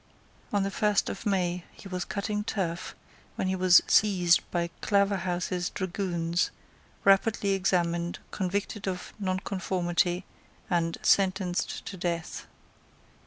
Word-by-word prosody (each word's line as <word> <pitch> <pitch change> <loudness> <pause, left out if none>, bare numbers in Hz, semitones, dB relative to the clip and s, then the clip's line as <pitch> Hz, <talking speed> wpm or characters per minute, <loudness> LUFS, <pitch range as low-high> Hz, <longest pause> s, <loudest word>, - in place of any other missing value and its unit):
On 205 -1 +2
the 195 - -1
first 210 0 +2
of 200 - -5
May 180 -3 0
he - - -12
was 180 -2 -3
cutting 210 +1 -2
turf, 180 -6 -3 0.4
when - - -1
he 190 - +1
was 185 -1 +6
seized 180 -5 +4
by 170 -1 -1
Claverhouse's 185 -3 +1
dragoons, 175 -2 -1 0.5
rapidly 200 +1 +3
examined, 175 -3 +1
convicted 200 +2 -2
of 180 -1 -4
nonconformity, 185 -2 -1 0.5
and 165 -1 +1
sentenced 190 -2 +1
to 195 - -6
death. 170 -2 -3
185 Hz, 115 wpm, -28 LUFS, 175-195 Hz, 0.5 s, was